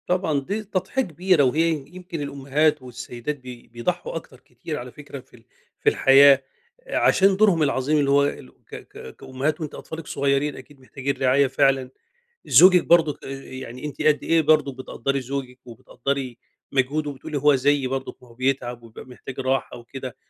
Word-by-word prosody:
طبعًا 180 -5 +1
دي 200 +10 -4
تضحية 195 +5 -2
كبيرة، 180 - +2
وهي 155 +6 +2 0.2
يمكن 175 -2 -8
الأمهات 140 +2 0
والسيدات 125 +2 -6
بي 125 -2 -11
بيضحوا 180 - -4
أكتر - - -8
كتير - - -8
على - - -8
فكرة - - -10
في - - -20
ال - - -20 0.4
في 435 - +3
الحياة، 135 - +6 0.4
آآ، - - -2
عشان 195 0 +4
دورهم 195 -7 +4
العظيم 140 +1 +1
اللي 140 -1 +1
هو 140 0 +5
الو 140 -2 -6
ك - - -9
ك - - -11
كأمهات. 140 +5 -3
وأنتِ 155 -2 -5
أطفالِك 160 -1 -8
صغيّرين، 140 +1 0
أكيد 135 +2 -14
محتاجين 135 +1 -4
رعاية 135 +1 +3
فعلًا. 135 -1 +1 0.6
زوجِك 180 -1 +7
برضُك، 165 -4 +3
آآ، - - -7
يعني 130 0 -8
أنتِ 145 -2 -6
قد 150 -1 +2
إيه 165 0 +3
برضه 150 -2 +2
بتقدّري 135 +1 -3
زوجِك 130 -1 -6
وبتقدّري 125 +2 -5 0.3
مجهوده، 140 +3 0
وبتقولي 140 +2 -6
هو 145 +1 +4
زيي 140 0 +1
برضُك، 135 0 -5
ما 125 - -17
هو - - -16
بيتعب 125 -1 -2
ويبقى 115 -1 -12
محتاج 130 +1 -10
راحة 135 -1 -1
وكده، 130 +1 -8
140 Hz, 170 wpm, -23 LUFS, 130-155 Hz, 0.6 s, زوجِك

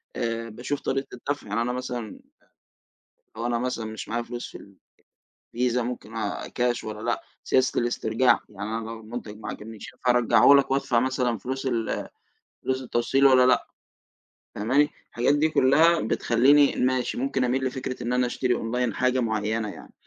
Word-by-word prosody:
آآ، 115 0 -2
باشوف 125 +6 -4
طريقة 135 0 -2
الدفع. 140 +1 -4
يعني 105 +3 -1
أنا 120 +1 -1
مثلًا، 125 -3 -5 1.2
لو 115 - -3
أنا 120 -1 0
مثلًا 125 -2 -2
مش 110 0 -7
معايا 120 +1 -1
فلوس 120 +1 -6
في 100 - -15 0.8
الفيزا 125 +1 +1
ممكن 115 -2 -6
آآ، 115 - -3
كاش 120 -1 -1
والّا 105 -1 -6
لأ، 120 +1 -2 0.2
سياسة 130 0 +2
الاسترجاع، 120 0 +2
يعني 100 +1 -6
أنا 115 - -5
لو 115 0 -7
المنتج 110 -1 -8
ما - - -6
عجبنيش 110 0 -8
فارجّعه 125 +2 +5
لك 140 -1 +3
وأدفع 135 -3 +2
مثلًا 125 -2 0
فلوس 130 +5 -5
ال 115 -4 -1 0.6
فلوس 130 0 -1
التوصيل 125 +3 +1
والّا 130 -2 +7
لأ 125 0 +3 0.9
فاهماني؟ 130 +8 +2 0.2
الحاجات 125 +4 +2
دي 155 +2 +2
كلّها 155 +4 +4
بتخليني 135 +6 +4
ماشي 130 0 0
ممكن 135 0 0
أميل 130 +2 0
لفكرة 130 0 -4
إن 120 - -1
أنا 125 0 +2
أشتري 125 0 0
أونلاين 120 0 -1
حاجة 130 0 +1
معيّنة 110 -1 -1
يعني. - - -11
125 Hz, 160 wpm, -25 LUFS, 115-130 Hz, 1.2 s, والّا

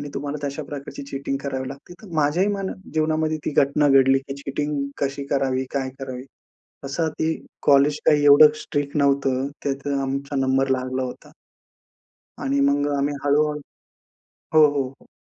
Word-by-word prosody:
आणि 145 - -6
तुम्हाला 145 +1 -4
तशा 140 - -4
प्रकारची 140 -1 -7
चीटिंग 135 0 -3
करावी 130 -2 -3
लागते. 140 +5 -10
तर 210 - -12
माझ्याही 155 +6 +2
मना 195 -1 -3 0.2
जीवनामध्ये 155 0 +1
ती - - -1
घटना 145 +1 +1
घडली 135 0 +5
की 135 0 -8
चीटिंग 145 +1 -2 0.2
कशी 140 0 -2
करावी? 130 -1 0
काय 135 -1 -1
करावी? 130 -1 -6 0.6
असं 160 +4 -1
ती 160 0 +1 0.3
कॉलेज 145 +1 +4
काही 150 -1 +4
एवढं 145 +1 +8
स्ट्रिक्ट 145 -1 -3
नव्हतं, 135 -2 +2 0.2
त्यात 140 0 -3 0.2
आमचा 140 +1 -3
नंबर 135 0 +2
लागला 130 0 -1
होता. 125 -1 -7 1.1
आणि 140 +1 0
मग 140 +1 +2
आम्ही 140 +1 0
हळू-हळू 150 +1 +2 1.0
हो, 155 - +7
हो, 135 -2 0
हो. 135 - -19
140 Hz, 155 wpm, -23 LUFS, 135-145 Hz, 1.1 s, एवढं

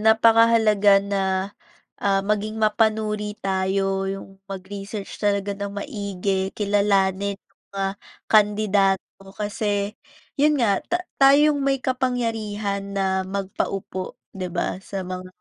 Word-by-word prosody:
Napakahalaga 220 -2 +5
na, 200 -1 -1 0.8
ah, 195 -1 +3
maging 210 +2 -1
mapanuri 215 -1 +1
tayo, 195 0 0
yung 195 0 -5 0.2
mag-research 195 +1 -7
talaga 200 -1 +1
nang 200 0 -4
maigi, 200 -4 -2
kilalanin 200 -1 +1
yung 195 - -42
mga 195 -1 -1 0.4
kandidato 205 -3 +2
kasi 205 0 -2 0.4
yun 300 +1 +4
nga, 205 -5 +3
ta 355 +1 -2 0.2
tayo 280 +2 +6
yung 290 - -2
may 270 0 +1
kapangyarihan 220 -6 -2
na 190 -1 +1
magpaupo, 190 -1 -3 0.2
'di 185 -1 -3
ba, 175 +1 -2
sa 195 -2 -5
mga 185 0 -6
200 Hz, 115 wpm, -23 LUFS, 195-215 Hz, 0.8 s, tayo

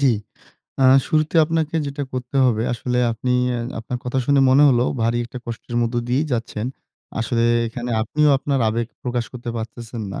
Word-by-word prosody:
জ্বি। 135 -4 +4 0.7
আ - - +5 0.2
শুরুতে 155 0 +1
আপনাকে 160 0 -1
যেটা 140 +1 -4
করতে 125 +1 -4
হবে, 115 -3 +2
আসলে 125 +1 -2
আপনি 125 +3 -2 0.2
এ - - -2 0.2
আপনার 120 +2 -4
কথা 125 +2 -1
শুনে 140 -1 +4
মনে 140 +3 +6
হলো 125 -1 +3 0.2
ভারী 115 +1 +1
একটা 125 +1 -8
কষ্টের 120 +1 -6
মধ্যে 120 +1 0
দিয়েই 140 +5 +1
যাচ্ছেন। 115 -1 -2 0.5
আসলে 115 +1 0 0.2
এখানে 120 +1 -5
আপনিও 150 +6 +2
আপনার 140 -2 -1
আবেগ 115 +1 -1 0.2
প্রকাশ 120 -1 -1
করতে 120 -1 -6
পারতেছেন 115 0 -6
না। - - -5
125 Hz, 175 wpm, -21 LUFS, 115-140 Hz, 0.7 s, মনে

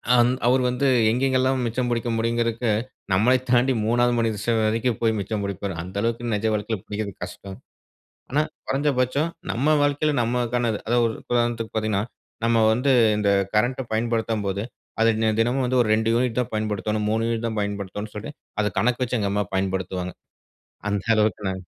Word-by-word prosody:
ஆந் 120 +1 +5 0.2
அவரு 130 +1 +4
வந்து, 125 +3 0 0.2
எங்கேங்கெல்லாம் 130 +1 +1
மிச்சம் 120 +2 -1
புடிக்க 120 0 -1
முடியுங்கறதுக்கு, 115 0 0 0.4
நம்மள 110 +7 +4 0.2
தாண்டி 125 +2 +4
3வது 120 +2 +3
மனித 115 -2 0
ச - - -11
வரைக்கும் 110 +2 +1
போயி 115 -1 +3
மிச்சம் 100 +1 -3
புடிப்பாரு. 100 -1 -3
அந்த 90 +3 -9
அளவுக்கு 115 0 -1
நெஜ 105 +2 -1
வாழ்க்கையில 105 0 -2
புடிக்கறது 105 -1 -4
கஷ்டம். 95 +2 -8 0.7
ஆனா 150 - +3 0.3
கொறஞ்ச 145 +2 +1
பட்சம் 140 +6 +1 0.2
நம்ம 145 +6 +2
வாழ்க்கையில 145 +1 +2
நம்மக்கானது. 120 -1 0
அதாவது 120 +1 +2
ஒரு 110 - -3 0.2
உதாரணத்துக்கு 120 -2 0
பாத்தீங்கன்னா, 105 -2 0 0.4
நம்ம 115 -1 +3
வந்து 130 +4 +1 0.3
இந்த 105 -1 +1 0.3
கரண்ட்ட 125 +5 +2
பயன்படுத்தும்போது 110 -3 -1 0.4
அதை 115 0 +5
நெ 110 - +3
தினமும் 125 +4 +2
வந்து 130 +1 +1
ஒரு 115 - +1
2 110 +1 +1
யூனிட் 120 0 +1
தான் 125 - -1
பயன்படுத்தோணும், 105 0 -1
3 110 +1 +1
யூனிட் 115 0 -1
தான் 110 -1 -4
பயன்படுத்தோணும் 100 +1 -4
சொல்லி, 105 +5 -6 0.3
அத 105 - +2
கணக்கு 125 +2 +1
வச்சு 125 0 -1
எங்க 100 -2 0
அம்மா 105 0 +1
பயன்படுத்துவாங்க. 95 -1 -2 0.8
அந்த 100 -2 -1
அளவுக்கு 105 -2 +1
நாங் 95 -1 -5
115 Hz, 165 wpm, -24 LUFS, 105-120 Hz, 0.8 s, ஆந்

